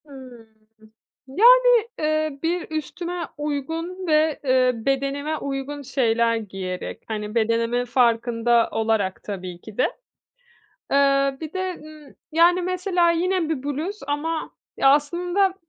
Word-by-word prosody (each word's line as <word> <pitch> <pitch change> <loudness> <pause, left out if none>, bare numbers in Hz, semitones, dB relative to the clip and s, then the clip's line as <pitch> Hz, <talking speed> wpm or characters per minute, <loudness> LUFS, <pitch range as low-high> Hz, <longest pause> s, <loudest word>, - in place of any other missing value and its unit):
Hıı. 255 -5 -13 0.8
Yani, 480 - +5
eee, 310 -2 -1
bir 345 +2 -1
üstüme 340 +3 -4
uygun 325 +5 -4
ve, 310 -1 +2
eee, 255 -2 +3
bedenime 275 +5 -1
uygun 280 +1 -5
şeyler 235 -4 +1
giyerek, 190 -4 -5
hani, 210 0 -5
bedenimin 230 +2 +1
farkında 235 -1 +2
olarak 220 -4 -1
tabii 185 -3 -7
ki 215 -2 -12
de. - - +3 1.1
Eee, 275 0 +3
bir 315 -1 -6
de, 375 -1 -2
ııı, 305 -2 -14 0.2
yani, 345 +3 +4
mesela 360 -1 +1
yine 350 0 0
bir 310 -5 -2
bluz 305 +9 -3
ama 310 +3 -2 0.3
ya, 270 - +5
aslında 355 +6 +1
285 Hz, 120 wpm, -23 LUFS, 240-335 Hz, 1.1 s, Yani